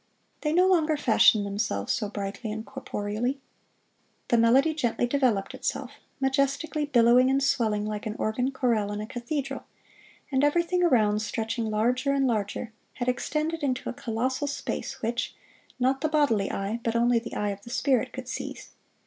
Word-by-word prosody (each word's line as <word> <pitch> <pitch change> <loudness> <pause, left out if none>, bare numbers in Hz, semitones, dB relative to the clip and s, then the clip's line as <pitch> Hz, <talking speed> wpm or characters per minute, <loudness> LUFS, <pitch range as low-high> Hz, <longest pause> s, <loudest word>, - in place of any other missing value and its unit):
They 300 - 0
no 360 +3 +4
longer 320 -5 +3
fashioned 220 -5 +5
themselves 200 - -1
so 210 - -2
brightly 200 +2 -5
and 220 +1 -5
corporeally. 215 +6 -3 0.9
The 235 - +4
melody 260 +7 +4
gently 245 -5 0
developed 240 -6 +1
itself, 265 -1 -3 0.3
majestically 275 +3 0
billowing 245 -1 +5
and 270 +1 +2
swelling 215 -6 +1
like 210 0 -4
an 215 - -4
organ 245 +4 0
chorale 235 -6 0
in 205 - -3
a 210 - -4
cathedral, 270 +4 -4 0.7
and 265 0 +2
everything 340 +4 +2
around, 215 -10 +3
stretching 225 +1 -2
larger 250 +6 +1
and 275 -1 +2
higher, 220 0 -2 0.2
had 245 0 -2
extended 305 +6 -1
into 260 -2 -1
a - - -8
colossal 250 +5 -2
space 285 - -4
which, 235 +2 -2 0.4
not 265 +2 +1
the 310 - +1
bodily 280 -10 +2
eye, 200 +4 -2
but 230 0 -1
only 235 0 +3
the 230 0 -8
eye 210 - 0
of 200 0 -5
the 235 - -12
spirit 260 -1 +1
could 260 -1 -7
seize. - - -6
245 Hz, 165 wpm, -27 LUFS, 215-275 Hz, 0.9 s, fashioned